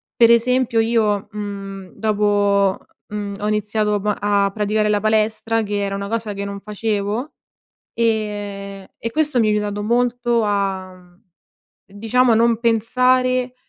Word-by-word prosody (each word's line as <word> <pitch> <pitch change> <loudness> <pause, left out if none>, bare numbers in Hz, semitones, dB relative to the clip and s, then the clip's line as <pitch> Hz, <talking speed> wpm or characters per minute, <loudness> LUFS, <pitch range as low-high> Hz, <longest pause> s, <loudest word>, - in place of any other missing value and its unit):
Per 235 -1 +6
esempio 235 0 +2
io, 220 -3 +1
mhmm, 195 -2 -7
dopo, 205 -2 +2 0.3
mhmm, 205 -1 -4
ho 210 - -1
iniziato 210 0 0
m 210 +1 -1
a 200 -1 +2
praticare 210 0 0
la 210 -1 +1
palestra 220 +1 +1
che 205 -1 -2
era 195 0 -2
una 200 0 -4
cosa 225 -1 -3
che 200 0 -5
non 200 0 -6
facevo 210 - -3 0.6
e 205 -3 -2
e 230 - -4
questo 300 -3 +1
mi 215 - +2
ha - - +3
aiutato 205 0 -1
molto 240 0 +1
a, 195 -2 -1
mhmm, 180 0 -20 0.7
diciamo 225 +4 +2
non 230 0 +3
pensare, 255 +2 +2
210 Hz, 140 wpm, -20 LUFS, 200-230 Hz, 0.7 s, Per